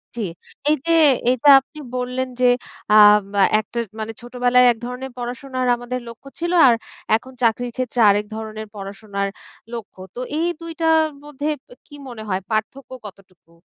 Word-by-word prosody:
জি। 235 - -4 0.5
এইযে 305 +2 0 0.4
এইযে 255 +3 +3
আপনি 305 +4 -15 0.2
বললেন 250 +1 -2
যে 255 - +3 0.5
আ - - +6 0.4
মা 200 - +2 0.2
একটা 220 - -8 0.2
মানে 220 +1 -4
ছোটবেলায় 245 +1 +2
এক 235 - -4
ধরনের 250 +2 -6
পড়াশোনার 255 +1 -4
আমাদের 245 +1 -5
লক্ষ্য 235 +4 -12
ছিল। 345 +1 -2 0.2
আর 240 - +5 0.4
এখন 260 +4 -5
চাকরির 240 +1 +1
ক্ষেত্রে 255 -1 -3
আরেক 205 +1 +2
ধরনের 220 0 -6
পড়াশোনার 200 0 -4 0.5
লক্ষ্য। 225 -5 -8 0.2
তো - - -6 0.2
এই 335 - +1
২ 335 0 -7
টার 320 -1 +4 0.2
মধ্যে 295 0 -5 0.4
কি 290 - -14
মনে 235 -4 -8
হয় 185 0 -1
পার্থক্য 220 +6 -3
কতটুকু? 185 -4 -14
245 Hz, 155 wpm, -21 LUFS, 220-260 Hz, 0.5 s, আ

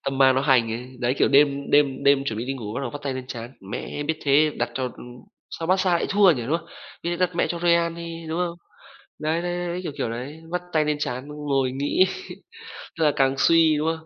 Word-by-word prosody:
tâm 135 0 -2
ma 130 -1 +6
nó 130 - +1
hành 125 -5 +3
ấy, 125 +3 -6
đấy, 125 +2 +1
kiểu - - +4
đêm 140 0 +3
đêm 140 -2 +3
đêm 140 -1 +4
chuẩn 110 -5 -3
bị 120 - -3
đi 135 - -2
ngủ 105 -5 -6
bắt - - -2
đầu 130 -3 -3
vắt 145 - -8
tay 135 -2 -2
lên 130 -1 -6
trán: 120 -1 -7 0.2
"Mẹ, 145 - -4
biết 155 +1 -2
thế 145 +2 +4
đặt 120 0 -1
cho, 130 - -2
ừm 125 0 -7 0.4
sao 165 - -5
Barca 185 0 +2
lại 170 - +1
thua 200 -2 +6
nhỉ", 125 -7 0
đúng 165 - +2
không? - - -17 0.4
"Biết 170 - -2
vậy 175 - -1
đặt 175 - -17
mẹ - - +2
cho 170 - -3
Real 170 -1 +2
đi, 170 0 -6
đúng 165 +2 -2
không?" 175 -1 -2 0.6
Đấy, 160 +2 0
đấy, 175 0 -2
đấy, 175 0 -3
đấy, 175 +1 -3
kiểu, 160 - -4
kiểu 115 - -1
đấy, 130 +7 -6
vắt 180 - -1
tay 155 -1 +3
lên 150 -1 0
trán 130 0 -3
ngồi 140 -3 -1
nghĩ, 145 +7 +2 0.9
tức - - +2
là 150 - +5
càng 135 -1 +2
suy, 165 -1 +4
đúng 155 +2 -1
không? 160 0 -2
145 Hz, 260 wpm, -24 LUFS, 130-165 Hz, 0.9 s, ma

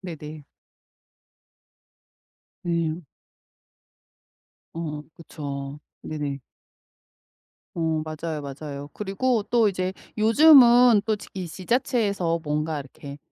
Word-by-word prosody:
네네. - - -69 2.6
네. 170 -1 -1 1.7
어 155 -3 -5
그쵸. 140 -3 -7 0.2
네네. 145 -3 -4 1.3
어 160 -2 0
맞아요, 155 0 -5
맞아요. 140 0 -7
그리고 215 +3 -1
또 225 -1 +3
이제 185 0 -2 0.2
요즘은 240 -2 +7
또 220 - +1
지 205 - -12
이 185 -2 -5
지자체에서 200 - 0
뭔가 150 0 -2
이렇게 140 +1 -10
170 Hz, 165 characters per minute, -24 LUFS, 150-215 Hz, 2.6 s, 요즘은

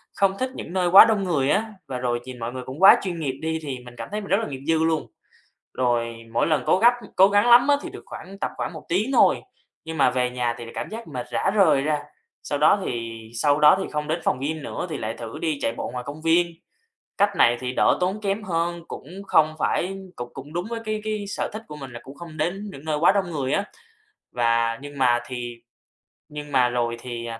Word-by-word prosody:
không 195 0 +2
thích 260 0 0
những 175 - -7
nơi 180 -2 +1
quá 195 - +11
đông 215 -3 +1
người 145 -7 +1
á, 215 +2 +1
và 130 - -4
rồi 120 -1 -1
nhìn 130 -2 -9
mọi 115 +1 -4
người 130 -1 -5
cũng 130 +4 -8
quá 195 - +9
chuyên 175 -3 -4
nghiệp 140 -4 -1
đi 160 0 -1
thì 135 -3 -4
mình 120 0 -12
cảm - - -7
thấy 210 +1 -2
mình 200 - -9
rất 195 - +5
là 225 - -2
nghiệp 135 -2 -7
dư 160 0 +3
luôn, 160 -1 0 0.7
rồi 120 -2 0 0.2
mỗi - - +2
lần 155 -2 +1
cố - - +3
gắp 240 +3 +6 0.2
cố 190 +1 +7
gắng 205 +4 +3
lắm 245 +3 +7
thì - - -6
được - - -11
khoảng 195 +2 -10
tập - - -2
khoảng - - -3
1 155 - -9
tiếng 210 +9 +1
thôi, - - +4 0.4
nhưng 160 0 -6
mà 135 - +5
về 125 -1 0
nhà 125 -1 -1
thì 120 - -8
lại 115 - -10
cảm - - -4
giác 230 +1 -7
mệt 125 -1 -5
rã 195 - +1
rời 170 -9 +4
ra. 150 0 0 0.4
Sau 145 - -2
đó 155 +7 +5
thì 115 -1 -4 0.2
sau 145 +3 +2
đó 150 - +7
thì - - -6
không 150 0 -3
đến 160 +3 -1
phòng 125 - +1
gym 150 +2 -3
nữa - - -4
thì 155 - -3
lại 110 -1 -3
thử 115 -1 -8
đi 155 -4 -1
chạy 115 - 0
bộ - - -3
ngoài 125 -1 -4
công 145 +2 -7
viên, 165 +2 +3 0.7
cách 200 0 +2
này 120 +1 +5
thì 125 0 -3
đỡ - - +3
tốn 190 +4 0
kém 200 +1 -1
hơn, 170 -2 -2
cũng - - -8 0.2
không 155 -2 +3
phải 190 +5 -1 0.2
cũng 120 0 -6
cũng 140 +3 -9
đúng 175 +3 -3
với 230 -1 -3
cái 215 0 -2
cái 215 -1 -2
sở - - -3
thích 215 +1 -6
của 150 - -8
mình 135 -3 -9
là 120 - -8
cũng 135 - -11
không 165 0 -10
đến 180 +7 -2
những 140 -2 -11
nơi 155 -1 -1
quá 175 +4 +5
đông 195 -3 0
người 140 -4 -2
á. 200 - +1 0.7
Và 115 -1 +1
nhưng 145 0 -9
mà 120 -2 +3
thì 120 -2 -5 0.7
nhưng 150 -1 -8
mà 125 -2 +4
rồi 120 -1 -1
thì, 120 -1 -6
ờ, 115 -1 -6
150 Hz, 250 wpm, -24 LUFS, 125-190 Hz, 0.7 s, quá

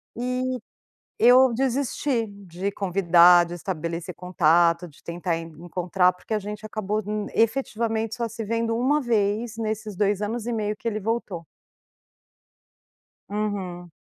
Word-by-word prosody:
E 250 +1 -2 0.6
eu 250 +2 +6
desisti 260 -1 0
de 195 -1 -5
convidar, 180 -3 +5
de 175 +1 -7
estabelecer 170 0 -4
contato, 170 -1 +2
de 150 - -20
tentar 170 0 -2
encontrar, 175 +3 0
porque 180 +5 -10
a - - +2
gente 210 +1 -7
acabou 215 0 -2
n 210 0 -3
efetivamente 225 -2 0
só 235 -1 -2
se 225 0 -6
vendo 230 +1 -1
uma 270 +5 +2
vez 225 -2 0
nesses 215 -2 -3
2 205 +1 +1
anos 225 +2 -3
e 240 - -1
meio 215 -2 -1
que 230 - -13
ele 215 -1 -1
voltou. 205 -5 -3 1.9
Uhum. 190 -5 -4
210 Hz, 130 wpm, -25 LUFS, 180-230 Hz, 1.9 s, eu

